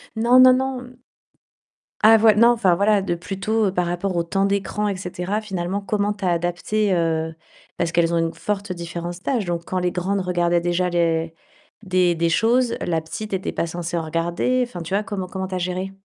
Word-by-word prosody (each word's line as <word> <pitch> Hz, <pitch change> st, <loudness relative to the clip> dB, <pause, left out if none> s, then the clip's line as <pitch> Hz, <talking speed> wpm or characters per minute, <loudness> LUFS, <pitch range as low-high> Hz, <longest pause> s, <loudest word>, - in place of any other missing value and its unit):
Non, 235 Hz, +3 st, +4 dB
non, 255 Hz, 0 st, +8 dB
non. 255 Hz, -1 st, -3 dB, 1.1 s
Ah 225 Hz, +1 st, +8 dB
voi 220 Hz, 0 st, +5 dB
non, 230 Hz, +3 st, +6 dB
enfin, 220 Hz, -7 st, +3 dB
voilà, 200 Hz, +2 st, +3 dB
de 175 Hz, -3 st, -2 dB
plutôt 200 Hz, +4 st, -1 dB
par 180 Hz, -2 st, -1 dB
rapport 175 Hz, +2 st, -2 dB
au 170 Hz, -, +1 dB
temps 195 Hz, +4 st, 0 dB
d'écran, 200 Hz, +1 st, -1 dB
et 200 Hz, -, -1 dB
cetera, 185 Hz, +3 st, -3 dB
finalement, 190 Hz, -1 st, -3 dB
comment 205 Hz, 0 st, -1 dB
tu 205 Hz, -, -12 dB
as -, -, +2 dB
adapté, 175 Hz, +4 st, 0 dB
heu, 160 Hz, -2 st, 0 dB, 0.4 s
parce 170 Hz, -1 st, -1 dB
qu'elles 170 Hz, 0 st, +2 dB
ont -, -, +2 dB
une 165 Hz, 0 st, -1 dB
forte 200 Hz, +3 st, -3 dB
différence 175 Hz, +1 st, -6 dB
d'âge, 245 Hz, -7 st, 0 dB
donc 170 Hz, -1 st, -3 dB
quand 185 Hz, -, -2 dB
les 180 Hz, 0 st, 0 dB
grandes 190 Hz, +3 st, -1 dB
regardaient 175 Hz, -1 st, +1 dB
déjà 175 Hz, +1 st, 0 dB
les 165 Hz, -1 st, 0 dB, 0.5 s
des 185 Hz, -2 st, +2 dB
des 165 Hz, 0 st, +1 dB
choses, 235 Hz, +6 st, +2 dB
la 165 Hz, -2 st, -1 dB
petite 205 Hz, +6 st, -7 dB
était 190 Hz, 0 st, -2 dB
pas -, -, -2 dB
censée 170 Hz, +1 st, -4 dB
en 165 Hz, -, -2 dB
regarder, 170 Hz, +10 st, 0 dB
enfin 180 Hz, -7 st, -8 dB
tu 170 Hz, +3 st, -6 dB
vois, 205 Hz, +2 st, +1 dB
comment 195 Hz, -2 st, -4 dB
comment 190 Hz, +1 st, -4 dB
tu 185 Hz, -, -5 dB
as -, -, -1 dB
géré? 185 Hz, +2 st, -3 dB
185 Hz, 205 wpm, -22 LUFS, 170-210 Hz, 1.1 s, non